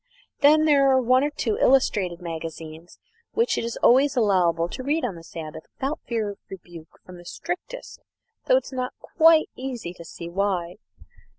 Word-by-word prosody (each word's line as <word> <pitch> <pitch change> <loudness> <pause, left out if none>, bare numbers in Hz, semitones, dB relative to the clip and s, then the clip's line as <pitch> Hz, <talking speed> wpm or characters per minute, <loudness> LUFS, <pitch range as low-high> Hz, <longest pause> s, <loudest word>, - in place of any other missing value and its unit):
Then 305 +2 +5
there 280 -3 +4
are 260 -1 +4
one 255 +1 +3
or 290 - +1
two 240 -7 -2
illustrated 195 -9 +2
magazines 165 0 -8 0.4
which 465 +2 +1
it - - -2
is 230 0 -4
always 270 +4 +5
allowable 180 -7 +2
to 215 - -7
read 290 +3 0
on 225 - -3
the 165 -1 -12
Sabbath 160 -1 -9
without 275 +3 -3
fear 225 -4 -2
of 200 - -13
rebuke 175 -4 -12
from 180 -1 -12
the 175 - -13
strictest 365 - -7 0.5
though - - +5
it - - -2
is - - -10
not 255 -1 -3
quite 325 -1 +4
easy 250 -9 -6
to 170 - -12
see 170 0 -9
why. 180 -1 -2
220 Hz, 180 wpm, -24 LUFS, 170-275 Hz, 0.5 s, Then